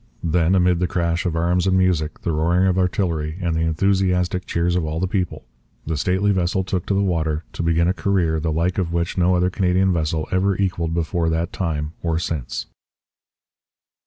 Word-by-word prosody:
Then, 85 +2 +2
amid 90 -2 +3
the 90 - +1
crash 85 +1 -1
of 85 - -2
arms 85 +3 +1
and 95 0 +3
music, 90 -5 0
the 85 - -1
roaring 85 +4 +2
of 95 -1 +2
artillery, 85 -4 -1
and 85 -3 -1
the - - 0
enthusiastic 90 +2 +1
cheers 85 +1 0
of 90 - +1
all 80 +1 -3
the 95 - +1
people, 90 -8 -3 0.4
the 80 - -2
stately 95 +6 +1
vessel 95 0 0
took 90 -1 -3
the 100 - +1
water, 80 -5 0
to - - -4
begin 85 0 +2
a 90 - +2
career 90 -5 0
the 80 +1 -1
like 85 +4 0
of 85 -3 -1
which 85 0 -1
no 90 0 +3
other 90 +1 +1
Canadian 95 0 +2
vessel 80 -1 -1
ever 95 +1 +1
equalled 85 -4 -1
before 85 0 0
that 80 +1 -1
time 80 -4 -2
or 85 -2 0
since. 75 -7 -3
85 Hz, 190 wpm, -21 LUFS, 80-90 Hz, 0.4 s, amid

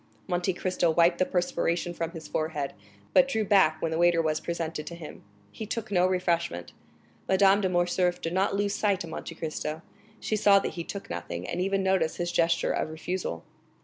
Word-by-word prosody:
Monte 175 +2 0
Cristo 180 -1 0
wiped 170 +2 +4
the 185 - +2
perspiration 175 -1 0
from 165 -1 -3
his 165 -2 -8
forehead, 155 -3 -2 0.4
but 270 - +6
drew 220 -5 0
back 190 -6 +4
when 165 - 0
the 160 - -1
waiter 175 -1 +4
was 155 -1 +1
presented 165 -2 -4
to 170 - -6
him; 165 -3 -10 0.3
he 220 - -7
took 220 -1 -4
no 180 -1 +4
refreshment. 170 - -1 0.6
Madame 195 +1 +5
de 190 - +1
Morcerf 175 0 +1
did 165 - -4
not 190 +1 +1
lose 200 0 0
sight 200 -3 +1
of 165 - -8
Monte 165 - -6
Cristo; 155 0 -4 0.4
she 215 - -1
saw 205 -1 +5
that 195 - -1
he 170 - -4
took 200 +3 -7
nothing, - - -5
and 180 - -2
even 195 +1 +1
noticed 190 -4 +1
his 175 0 -2
gesture 170 -1 +2
of - - -1
refusal. 160 - -4
175 Hz, 195 wpm, -28 LUFS, 165-190 Hz, 0.6 s, but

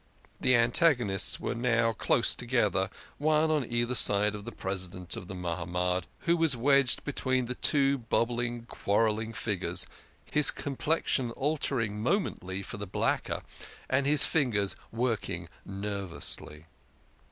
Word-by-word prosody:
The 130 0 +4
antagonists 120 - +3
were - - -3
now 115 -1 +1
close - - +2
together, - - 0 0.3
one 155 +1 +2
on 145 -7 -1
either 120 +1 0
side 105 -3 +5
of 105 -1 -8
the - - -6
President 90 -2 -3
of 90 - -8
the 95 - -7
Mahamad, 90 +1 -2 0.2
who 170 - +2
was 165 -6 +3
wedged 140 +1 +3
between 130 -3 -1
the 125 - -4
two 140 +1 +2
bobbing, 120 0 -1
quarrelling 110 0 0
figures, 105 -3 -1 0.4
his 150 -2 +4
complexion 140 -2 -1
altering 125 -6 -2
momently 100 - -2
for - - -7
the 100 0 -6
blacker, 95 - -1 0.4
and 135 +1 +1
his 150 0 +6
fingers 110 -10 0 0.2
working 110 -7 -2 0.2
nervously. 95 -6 -4
115 Hz, 130 wpm, -29 LUFS, 100-135 Hz, 0.4 s, his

